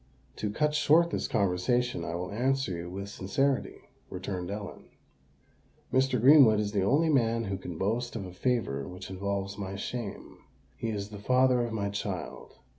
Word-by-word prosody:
"To 105 - -2
cut 150 +8 0
short 160 +3 +4
this - - -1
conversation, 100 +1 +1
I 85 - -4
will 90 +1 -4
answer 130 -2 0
you 85 +1 -6
with 100 +2 -6
sincerity," 135 +8 -1 0.2
returned 90 -1 -5
Ellen. 100 0 -6 1.1
"Mr. 130 -1 +3
Greenwood 130 -4 +7
is 105 -1 -1
the 100 -2 +1
only 145 - +3
man 115 -5 +2
who 95 -2 -3
can 90 -3 -7
boast 115 +7 -1
of 105 -4 -4
a 90 - -9
favour 90 - -1
which 90 +3 -8
involves 100 +1 -3
my 95 -1 -4
shame: 100 0 -6 0.4
he 115 - -3
is 100 -2 -3
the 105 -1 -9
father 125 +3 +3
of 120 - -3
my 100 -2 -1
child. 100 -5 -5
105 Hz, 170 wpm, -29 LUFS, 95-125 Hz, 1.1 s, Greenwood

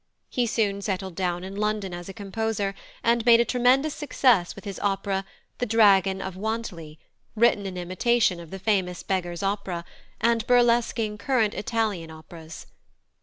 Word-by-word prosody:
He 245 -2 0
soon 205 -3 0
settled 190 -2 -3
down 175 0 -2
in 190 +1 -7
London 210 -2 -1
as 175 +1 -7
a - - -4
composer, 205 0 -2 0.3
and 235 0 +2
made 230 0 +7
a 235 - +4
tremendous 255 +5 +2
success 250 - +2
with 200 - -12
his 200 -2 -6
opera 195 -1 -1 0.3
The 245 - -1
Dragon 195 -3 +4
of 190 -1 -6
Wantly, 190 -7 -5 0.4
written 210 -3 +3
in 185 -1 -6
imitation 185 +2 +1
of 170 -2 -10
the 195 - -6
famous 190 -3 -1
Beggar's 175 -1 -2
Opera, 195 -4 -2 0.3
and 230 -1 +2
burlesquing 235 -3 +2
current 225 -3 +1
Italian 210 -7 -2
operas. 160 0 -11
200 Hz, 155 wpm, -25 LUFS, 185-230 Hz, 0.4 s, made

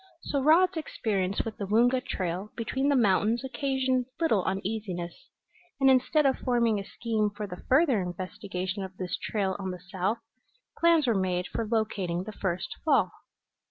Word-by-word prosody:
So 280 - -1
Rod's 340 +5 +5
experience 200 -10 -1
with 225 -1 -5
the 200 - -4
Woonga 245 +5 +3
trail 185 +3 -3
between 265 +5 0
the 285 - +4
mountains 220 +1 +3
occasioned 265 -2 0
little 225 - +2
uneasiness, 190 -3 -4 0.5
and 270 -1 +6
instead 265 +4 +3
of 265 -1 +2
forming 235 -4 +2
a - - -4
scheme 215 0 -1
for 205 +1 -6
the 180 -3 -8
further 265 - +4
investigation 185 +2 -4
of 190 -1 -7
this 180 -1 -3
trail 195 -3 -1
on 190 -1 -3
the 180 -1 -5
south, 195 +4 0 0.6
plans 335 -3 +4
were 235 - +3
made 185 -2 0
for 225 - -3
locating 200 -6 -1
the 215 - -7
first 185 -4 -3
fall. 305 -3 +3
215 Hz, 160 wpm, -28 LUFS, 190-260 Hz, 0.6 s, and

